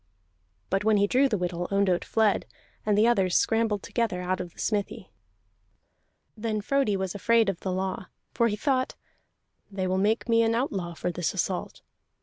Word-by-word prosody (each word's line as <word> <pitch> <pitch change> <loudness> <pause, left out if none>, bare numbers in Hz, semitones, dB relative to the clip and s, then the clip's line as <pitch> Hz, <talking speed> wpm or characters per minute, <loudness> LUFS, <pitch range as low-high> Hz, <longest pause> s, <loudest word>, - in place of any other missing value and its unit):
But 195 +1 +1
when 215 0 +4
he 200 - +4
drew 260 +6 +3
the 215 - 0
whittle, 175 -1 -2
Ondott 195 -3 +2
fled, 220 -3 +1 0.4
and 210 -1 +3
the 215 - +5
others 195 -7 +2
scrambled 225 -3 +1
together 225 -7 -1
out 185 +1 -2
of 175 - -7
the - - -30
smithy. 205 -2 -3 1.2
Then 215 -1 -2
Frodi 215 -2 +1
was 190 -1 -3
afraid 225 +1 +3
of 185 -3 -3
the 190 - -3
law, 185 0 -3 0.3
for 235 - +3
he 210 - -1
thought: 260 +3 0 0.7
"They 195 -2 -3
will 185 +1 0
make 215 +5 +1
me 230 -1 +4
an 225 0 +2
outlaw 195 -9 -2
for 180 - -2
this 175 -1 -2
assault." - - -3
205 Hz, 175 wpm, -27 LUFS, 185-230 Hz, 1.2 s, the